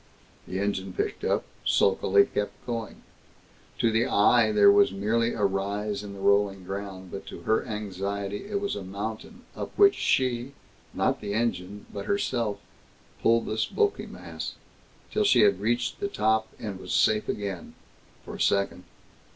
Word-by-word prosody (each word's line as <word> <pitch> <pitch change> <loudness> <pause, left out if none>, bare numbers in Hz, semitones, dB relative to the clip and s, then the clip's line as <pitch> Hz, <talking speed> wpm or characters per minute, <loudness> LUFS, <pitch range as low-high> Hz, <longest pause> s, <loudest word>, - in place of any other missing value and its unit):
The 95 - -4
engine 95 -2 -2
picked - - -3
up, - - +1 0.2
sulkily 100 +1 +4
kept 105 0 -4
going. 115 -3 -5 0.7
To 115 - +2
the 115 +2 +2
eye, 110 +2 +4
there 200 - +7
was 205 0 +5
merely 115 +4 0
a 105 - 0
rise 100 +1 -1
in 100 -1 -7
the 100 - -9
rolling 100 -1 +2
ground, 95 -1 -6
but 95 - -7
to - - -8
her 110 -1 +1
anxiety 100 - -4
it 205 -1 -1
was 200 0 -2
a 100 - -5
mountain 105 - -6
up - - -5
which 400 -1 +7
she 125 0 0 0.4
not - - 0
the 100 -1 -3
engine, 105 -3 -2
but 100 - -5
herself 120 - 0 0.6
pulled 115 0 +3
this 110 +1 -1
bulky 420 -2 0
mass, - - -7 0.6
till 215 - +1
she 130 - +5
had 100 -3 +4
reached 120 +3 0
the 200 - -1
top, 110 - +1
and 100 -4 -6
was 95 - -3
safe 105 0 +3
again 100 -4 -4 0.5
for - - -8
a - - -6
second. 100 -2 +1
105 Hz, 160 wpm, -27 LUFS, 100-115 Hz, 0.7 s, there